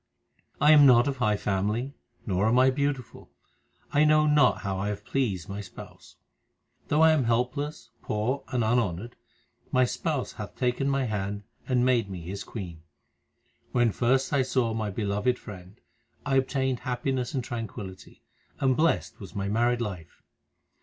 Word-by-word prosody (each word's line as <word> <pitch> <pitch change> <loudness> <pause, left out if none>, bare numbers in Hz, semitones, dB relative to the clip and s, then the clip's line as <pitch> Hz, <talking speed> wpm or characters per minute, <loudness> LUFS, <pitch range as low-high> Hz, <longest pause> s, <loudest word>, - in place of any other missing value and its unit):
I 150 - +6
am 145 -2 +8
not 125 +1 +6
of 140 -1 -2
high 105 -4 +1
family, 105 +8 -1 0.3
nor 95 0 +1
am 115 +2 +3
I 130 +1 +5
beautiful; 135 -3 -3 0.6
I 145 - +5
know 155 0 +5
not 150 -1 +4
how 95 -2 -3
I 100 - -2
have 105 -1 -4
pleased 105 -11 -1
my 100 +1 -5
Spouse. 95 - -12 0.7
Though 150 +2 +3
I 160 - +7
am 150 -5 +2
helpless, 125 +6 -1
poor, 120 +6 -2
and 125 -2 -1
unhonoured, 110 -1 0 0.6
My 130 0 +4
Spouse 145 +1 -2
hath 105 -2 -8
taken 130 +2 0
my 135 -1 +1
hand 105 -3 -3 0.2
and 125 -1 +2
made 120 -5 +2
me 90 -3 -6
His 95 +4 -6
queen. 85 -7 -8 0.9
When 120 -2 +3
first 130 +6 +1
I 140 - +4
saw 125 -3 0
my 110 -1 -2
Beloved 105 +4 0
Friend, 95 -1 -11 0.5
I 135 -2 +2
obtained 130 -1 0
happiness 125 +1 -2
and 130 - -1
tranquillity, 110 -5 -7 0.4
and 135 -2 +2
blest 165 +4 0
was 100 -1 -10
my 100 0 -2
married 120 +3 +1
life. 90 -8 -6
120 Hz, 160 wpm, -27 LUFS, 105-135 Hz, 0.9 s, am